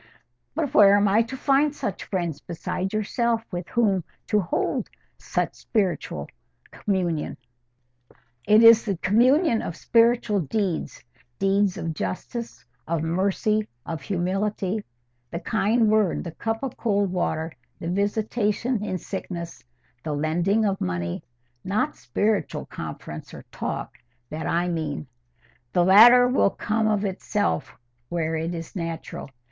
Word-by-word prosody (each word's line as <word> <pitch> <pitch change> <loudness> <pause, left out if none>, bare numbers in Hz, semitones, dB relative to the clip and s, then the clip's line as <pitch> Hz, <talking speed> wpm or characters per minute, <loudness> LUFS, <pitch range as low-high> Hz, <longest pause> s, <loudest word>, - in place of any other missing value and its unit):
"But 310 -3 -1
where 200 -1 +7
am 205 0 +4
I 205 +3 +4
to 235 +4 -4
find 280 +2 +2
such 205 - -4
friends 170 -6 -3
besides 180 +2 -4
yourself 225 +2 0
with 175 -1 -4
whom 200 -6 +2 0.3
to 210 - +3
hold 310 - -1 0.3
spiritual 195 -6 -2 0.4
communion?" 180 -6 -1 1.1
"It 215 +2 +6
is 230 0 +9
the 200 -5 -2
communion 240 - +3
of 165 - -5
spiritual 230 -2 +3
deeds, 185 - -2 0.3
deeds 195 -1 +2
of 165 -1 -3
justice, 155 - -5 0.2
of 165 -1 -1
mercy, 200 +5 +1 0.2
of 165 -3 -4
humility—the 175 - -3
kind 225 +1 +2
word, 215 -4 +2
the 170 - -6
cup 225 +8 -3
of 260 -2 -4
cold 200 -4 +1
water, 165 -3 -1 0.3
the 165 - -5
visitation 210 +3 0
in 185 -3 -2
sickness, 170 -6 -6 0.4
the 155 - -2
lending 175 +9 +1
of 195 -1 -1
money—not 120 - -3
spiritual 205 -6 -1
conference - - -8
or - - -10
talk, - - -5 0.3
that 155 +1 -4
I 175 +1 +1
mean: 155 -4 -3 0.7
the 175 -1 +4
latter 240 +6 +8
will 250 -5 +3
come 220 +2 -1
of 210 -1 +1
itself 190 - -1 0.3
where 165 -2 -1
it 165 +2 -2
is 165 +2 -7
natural. 165 -4 -5
195 Hz, 125 wpm, -25 LUFS, 165-220 Hz, 1.1 s, is